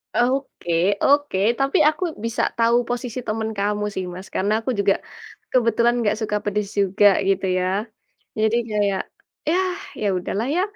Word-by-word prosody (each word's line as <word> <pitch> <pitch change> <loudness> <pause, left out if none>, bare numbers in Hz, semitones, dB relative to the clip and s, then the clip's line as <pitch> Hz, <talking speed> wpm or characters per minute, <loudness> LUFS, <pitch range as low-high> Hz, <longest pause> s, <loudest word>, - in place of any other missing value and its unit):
Oke 255 -7 0 0.3
oke 285 -7 +3 0.2
tapi 275 +6 +2
aku 340 - -4 0.2
bisa 230 -1 -1 0.2
tahu 230 +1 +4
posisi 245 0 -3
temen 220 +1 -1
kamu 210 +1 0
sih, 190 - -3
Mas, 185 +2 -9
karena 205 +3 +1
aku 255 - -1
juga 200 -1 +4 0.6
kebetulan 235 -1 +3
enggak 215 -2 +1
suka 210 -1 0
pedes 205 0 -1
juga 200 +1 +4 0.2
gitu 195 0 +1 0.2
ya. 180 - 0 0.7
Jadi 220 +2 +2
kayak 200 -2 +1 0.5
ya, 355 +3 +3 0.4
ya 210 - +1
udahlah 200 +6 -2
ya, 360 - +2
215 Hz, 150 wpm, -22 LUFS, 200-240 Hz, 0.7 s, tahu